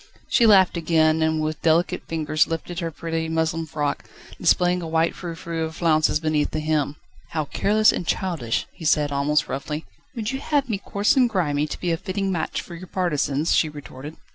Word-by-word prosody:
She 235 - +4
laughed 190 -4 +5
again, 160 -1 +2
and 160 0 +1
with 155 0 -3
delicate 165 +2 +1
fingers 155 -1 +1
lifted 165 +2 -4
her 170 -2 -2
pretty 165 0 -3
muslin 160 0 -1
frock, 145 -1 -3 0.3
displaying 180 0 +3
a 165 - -5
white 160 +1 +1
frou 170 -2 -6
frou 165 0 -4
of 160 0 -5
flounces 155 -3 +2
beneath 155 -2 0
the 155 - -3
hem. 150 -2 0 0.4
"How 155 -2 -1
careless 215 +8 +3
and 175 - -4
childish!" 165 -14 -1
he - - -13
said, 150 -2 +2
almost 145 +2 +1
roughly. 150 +3 -4 0.3
"Would 225 0 -2
you 265 - -3
have 285 -2 0
me 205 -3 -1
coarse 200 +5 +1
and 255 -3 +4
grimy 150 -8 0
to - - -6
be 175 - -1
a 165 - +1
fitting 195 +1 -2
match 170 -3 -2
for 175 - -11
your 180 +2 -9
partisans?" 155 -5 0
she 155 - +3
retorted. 145 0 -9
160 Hz, 195 wpm, -23 LUFS, 155-180 Hz, 0.4 s, laughed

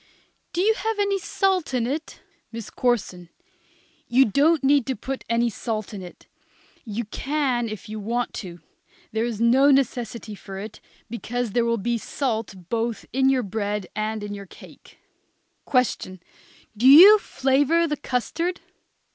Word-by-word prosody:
_ - - -48
Do 350 - -1
you 435 +3 +4
have 445 0 -3
any 400 -1 +1
salt 375 -7 0
in 240 -2 +1
it? 300 +6 -5 0.3
MISS 230 -2 -7
CORSON. 190 -8 -1 0.8
You 260 +3 +5
don't 290 +8 +2
need 275 -2 +3
to 265 - -1
put 265 +5 -5
any 235 +1 +2
salt 215 0 -4
in 200 - -6
it. 180 -1 -12 0.6
You 225 0 -4
can 260 0 -1
if 215 +1 -8
you 215 0 -6
want 235 +3 -2
to. 175 -4 -10 0.5
There 220 +1 0
is 230 -3 -4
no 255 +5 +5
necessity 245 -5 0
for 195 -1 -9
it, 210 +2 -8 0.3
because 235 0 -4
there 235 +3 +1
will 230 0 +1
be 235 +3 -1
salt 225 -5 -3
both 230 -1 -2
in 265 +1 +3
your 260 -2 +2
bread 205 -1 -3
and 215 0 -2
in 205 0 -5
your 200 -1 -8
cake. - - -16 0.7
Question. 250 -8 0 0.6
Do 235 +5 +2
you 375 +10 +10
flavor 290 +1 +2
the 300 - -1
custard? 330 +10 -2
240 Hz, 155 wpm, -24 LUFS, 215-275 Hz, 0.8 s, you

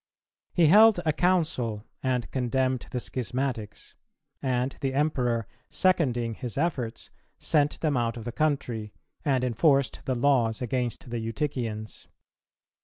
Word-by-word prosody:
He 175 - +4
held 210 +4 +7
a 155 - +2
council, 150 - 0 0.2
and 125 -2 -1
condemned 130 0 0
the 125 - -2
schismatics; 125 -3 -4 0.5
and 130 0 0
the 135 -1 -1
Emperor, 125 -6 +1 0.2
seconding 125 -11 +1
his 120 +2 -5
efforts, 140 -8 -2 0.3
sent 145 -1 +1
them 150 -3 +1
out 120 -1 0
of 115 - -6
the 120 - -3
country, 120 -8 -1 0.3
and 135 -5 +1
enforced 135 +1 +2
the 130 - 0
laws 120 -4 +2
against 125 +2 -3
the 120 - -2
Eutychians. 115 -2 -4
130 Hz, 125 wpm, -27 LUFS, 115-145 Hz, 0.5 s, held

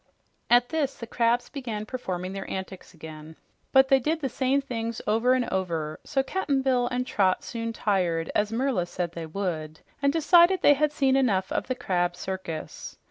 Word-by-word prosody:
At 245 0 +5
this 300 -4 -1
the 230 - -7
crabs 235 +1 +1
began 230 -7 -5
performing 185 -7 -4
their 195 0 -6
antics 190 -1 -7
again, 155 0 -10 0.4
but 265 0 +5
they 270 - +6
did 315 +5 -1
the 275 -4 -2
same 260 +3 +1
things 230 -4 -4
over 230 +4 +3
and 255 -1 +1
over, 165 -5 -2
so 270 -2 0
Cap'n 280 -4 -1
Bill 250 -2 +2
and 250 0 -2
Trot 190 -6 +1
soon 230 -1 -4
tired, 180 -7 0
as 210 +1 +1
Merla 230 -7 0
said 175 -1 -3
they 170 -2 -6
would, 160 -3 -4 0.2
and 280 0 +3
decided 345 +3 +5
they 290 - +8
had 300 +1 +1
seen 270 -3 +2
enough 200 -8 +1
of - - -1
the 255 - -1
crab 175 -5 -1
circus. 180 -4 -6
230 Hz, 185 wpm, -26 LUFS, 185-265 Hz, 0.4 s, they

